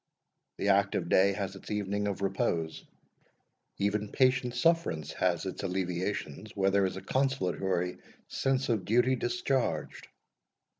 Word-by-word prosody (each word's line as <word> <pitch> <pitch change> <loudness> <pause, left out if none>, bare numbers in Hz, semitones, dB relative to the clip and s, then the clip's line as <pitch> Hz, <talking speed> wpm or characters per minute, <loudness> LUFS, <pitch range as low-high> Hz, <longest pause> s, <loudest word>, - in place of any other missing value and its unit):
The 100 - 0
active 95 -3 +2
day 100 +1 +5
has 100 -1 -4
its 95 - -11
evening 105 0 -1
of 100 -1 -3
repose; 95 -5 -1 0.9
even 100 +1 0
patient 130 -2 +2
sufferance 125 - +1
has 90 -1 0
its 95 - -4
alleviations, 95 0 -3
where 95 0 +2
there 100 -1 +3
is 95 - -5
a - - -6
consolatory 95 -9 0 0.3
sense 135 0 0
of 110 -5 +1
duty 125 +4 +3
discharged." 120 +2 -1
100 Hz, 130 wpm, -30 LUFS, 95-120 Hz, 0.9 s, day